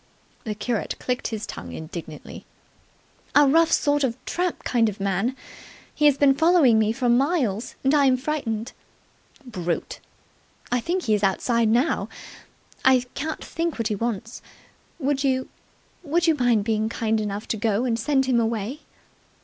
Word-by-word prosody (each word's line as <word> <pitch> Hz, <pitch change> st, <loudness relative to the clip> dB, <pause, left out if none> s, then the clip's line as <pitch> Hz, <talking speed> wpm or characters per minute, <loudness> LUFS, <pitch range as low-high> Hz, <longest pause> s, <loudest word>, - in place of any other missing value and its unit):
The 215 Hz, -2 st, -3 dB
curate 220 Hz, +1 st, -2 dB
clicked 250 Hz, 0 st, -2 dB
his 220 Hz, -2 st, -4 dB
tongue 85 Hz, +1 st, -8 dB
indignantly. 160 Hz, -1 st, -8 dB, 0.9 s
"A 290 Hz, 0 st, +7 dB
rough 325 Hz, +4 st, +4 dB
sort 290 Hz, -2 st, +2 dB
of 240 Hz, -3 st, 0 dB
a -, -, -32 dB
tramp 360 Hz, 0 st, -2 dB
kind 230 Hz, -3 st, +2 dB
of 200 Hz, -, -8 dB
man. 195 Hz, +6 st, 0 dB, 0.6 s
He 300 Hz, -, +1 dB
has 285 Hz, -2 st, +4 dB
been 280 Hz, -1 st, +5 dB
following 300 Hz, -6 st, +4 dB
me 215 Hz, 0 st, +2 dB
for 245 Hz, +2 st, -1 dB
miles, 245 Hz, -, +1 dB
and 270 Hz, +2 st, +3 dB
I'm 275 Hz, -3 st, +4 dB
frightened." 250 Hz, -5 st, -3 dB, 0.7 s
"Brute!" 180 Hz, -8 st, -4 dB, 0.7 s
"I 245 Hz, -, +2 dB
think 350 Hz, +9 st, -2 dB
he's 215 Hz, -3 st, +1 dB
outside 230 Hz, +4 st, +2 dB
now. 245 Hz, +8 st, +1 dB, 0.7 s
I 260 Hz, -1 st, +4 dB
can't 310 Hz, +2 st, -4 dB
think 330 Hz, -1 st, -3 dB
what 230 Hz, -1 st, -1 dB
he 210 Hz, -, 0 dB
wants. 230 Hz, +1 st, -4 dB, 0.6 s
Would 280 Hz, -2 st, -1 dB
you 260 Hz, -1 st, 0 dB, 0.5 s
would 335 Hz, +2 st, 0 dB
you 325 Hz, -, +4 dB
mind 245 Hz, -7 st, +2 dB
being 220 Hz, 0 st, 0 dB
kind 220 Hz, -1 st, 0 dB
enough 205 Hz, +1 st, -4 dB
to 220 Hz, -, -1 dB
go 220 Hz, +2 st, 0 dB
and 230 Hz, -2 st, 0 dB
send 270 Hz, +2 st, +1 dB
him 255 Hz, -2 st, +2 dB
away?" 230 Hz, +4 st, -2 dB
245 Hz, 155 wpm, -24 LUFS, 220-280 Hz, 0.9 s, A